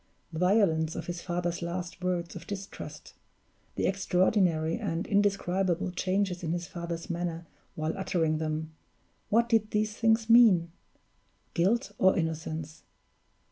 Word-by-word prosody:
The 160 Hz, -, -4 dB
violence 180 Hz, -4 st, +3 dB
of -, -, -4 dB
his 175 Hz, -1 st, -5 dB
father's 175 Hz, 0 st, -2 dB
last 175 Hz, +1 st, -5 dB
words 175 Hz, -2 st, -1 dB
of -, -, -9 dB
distrust; 200 Hz, -1 st, -8 dB, 0.6 s
the -, -, 0 dB
extraordinary 180 Hz, -3 st, +2 dB
and 165 Hz, +4 st, -2 dB
indescribable 195 Hz, -2 st, +1 dB
changes 185 Hz, 0 st, -1 dB
in 165 Hz, -1 st, -2 dB
his 175 Hz, 0 st, -3 dB
father's 170 Hz, -2 st, -5 dB
manner 170 Hz, -2 st, -3 dB, 0.3 s
while 155 Hz, +1 st, -2 dB
uttering 165 Hz, -5 st, 0 dB
them 155 Hz, 0 st, -3 dB, 0.6 s
what 235 Hz, +2 st, +3 dB
did 225 Hz, -2 st, +2 dB
these 215 Hz, 0 st, 0 dB
things 225 Hz, 0 st, +2 dB
mean? 215 Hz, -8 st, +6 dB, 0.8 s
Guilt 205 Hz, +7 st, +1 dB
or 190 Hz, +1 st, +5 dB
innocence? 160 Hz, -1 st, -3 dB
180 Hz, 130 wpm, -29 LUFS, 165-200 Hz, 0.8 s, mean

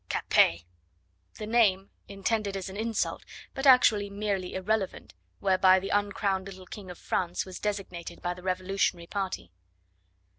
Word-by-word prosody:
"Capet!" 85 Hz, 0 st, +3 dB, 0.7 s
the 215 Hz, -, -5 dB
name 210 Hz, -4 st, +2 dB, 0.2 s
intended 200 Hz, 0 st, -1 dB
as 190 Hz, 0 st, -5 dB
an 190 Hz, -, -9 dB
insult, 225 Hz, +1 st, -2 dB, 0.3 s
but 270 Hz, 0 st, -1 dB
actually 220 Hz, -6 st, +6 dB
merely 200 Hz, -2 st, -3 dB
irrelevant 195 Hz, +1 st, -2 dB, 0.3 s
whereby 190 Hz, -1 st, +5 dB
the 195 Hz, -, -5 dB
uncrowned 200 Hz, -1 st, 0 dB
little 190 Hz, -1 st, -10 dB
King 195 Hz, 0 st, -9 dB
of 180 Hz, -, -8 dB
France 175 Hz, -1 st, -2 dB
was 185 Hz, -1 st, -8 dB
designated 185 Hz, -5 st, -4 dB
by 175 Hz, -, -2 dB
the 180 Hz, -, -12 dB
revolutionary 185 Hz, -1 st, -1 dB
party. 190 Hz, -, -4 dB
195 Hz, 140 wpm, -28 LUFS, 185-205 Hz, 0.7 s, actually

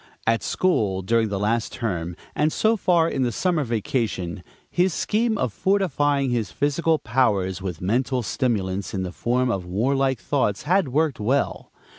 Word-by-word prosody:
At 115 Hz, 0 st, +2 dB
school, 105 Hz, -, 0 dB
during 115 Hz, +2 st, +2 dB
the 100 Hz, -, -2 dB
last 110 Hz, +3 st, 0 dB
term, 90 Hz, -7 st, -3 dB, 0.2 s
and 150 Hz, +1 st, +1 dB
so 220 Hz, +6 st, +2 dB
far 175 Hz, -5 st, +3 dB
in 135 Hz, -, -2 dB
the 125 Hz, -2 st, +1 dB
summer 170 Hz, -, 0 dB
vacation, 110 Hz, -6 st, -2 dB, 0.3 s
his 180 Hz, -1 st, +2 dB
scheme 220 Hz, +1 st, +1 dB
of 125 Hz, -5 st, -1 dB
fortifying 145 Hz, -8 st, +1 dB
his 115 Hz, -6 st, -1 dB
physical 155 Hz, -, +1 dB
powers 105 Hz, -8 st, 0 dB
with 90 Hz, -4 st, -5 dB
mental 125 Hz, +6 st, 0 dB
stimulants 100 Hz, -7 st, -1 dB
in 95 Hz, -, -1 dB
the 90 Hz, -, -4 dB
form 125 Hz, +4 st, 0 dB
of 95 Hz, -5 st, -2 dB
warlike 130 Hz, +7 st, +1 dB
"thoughts" 120 Hz, -9 st, 0 dB
had 180 Hz, +2 st, +2 dB
worked 145 Hz, +1 st, 0 dB
well. 130 Hz, +7 st, -1 dB
125 Hz, 160 wpm, -23 LUFS, 100-150 Hz, 0.3 s, far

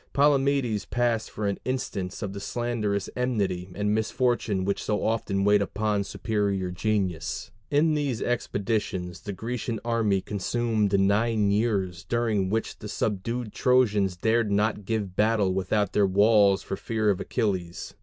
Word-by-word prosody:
Palamedes 140 Hz, -5 st, +2 dB
passed 120 Hz, -2 st, 0 dB
for 105 Hz, -, -4 dB
an 100 Hz, -1 st, -1 dB
instance 100 Hz, -8 st, -3 dB
of 100 Hz, -1 st, -4 dB
the 100 Hz, -, -6 dB
slanderous 105 Hz, -2 st, -2 dB
enmity 100 Hz, -8 st, -1 dB
and 105 Hz, +1 st, 0 dB
misfortune 110 Hz, -3 st, 0 dB
which 100 Hz, 0 st, -1 dB
so 105 Hz, -, -1 dB
often 105 Hz, -3 st, 0 dB
wait 105 Hz, 0 st, +4 dB
upon 105 Hz, 0 st, 0 dB
superior 100 Hz, -3 st, -1 dB
genius. 95 Hz, 0 st, -2 dB, 0.2 s
In 155 Hz, +2 st, +3 dB
these 140 Hz, -6 st, -1 dB
expeditions 100 Hz, -6 st, -2 dB
the 105 Hz, -, -5 dB
Grecian 115 Hz, +3 st, -4 dB
army 115 Hz, -4 st, +2 dB
consumed 105 Hz, 0 st, 0 dB
nine 105 Hz, +1 st, +2 dB
years, 100 Hz, -6 st, 0 dB
during 105 Hz, -1 st, 0 dB
which 110 Hz, +2 st, -2 dB
the 105 Hz, -, -7 dB
subdued 110 Hz, +3 st, -2 dB
Trojans 105 Hz, -8 st, +2 dB
dared 110 Hz, +2 st, +1 dB
not 105 Hz, 0 st, +1 dB
give 105 Hz, -4 st, -2 dB
battle 105 Hz, -3 st, +2 dB
without 95 Hz, +2 st, 0 dB
their 100 Hz, -1 st, +4 dB
walls 100 Hz, 0 st, +4 dB
for -, -, -3 dB
fear 110 Hz, 0 st, 0 dB
of 95 Hz, -, -2 dB
Achilles. 90 Hz, -5 st, -2 dB
105 Hz, 145 wpm, -26 LUFS, 100-115 Hz, 0.2 s, wait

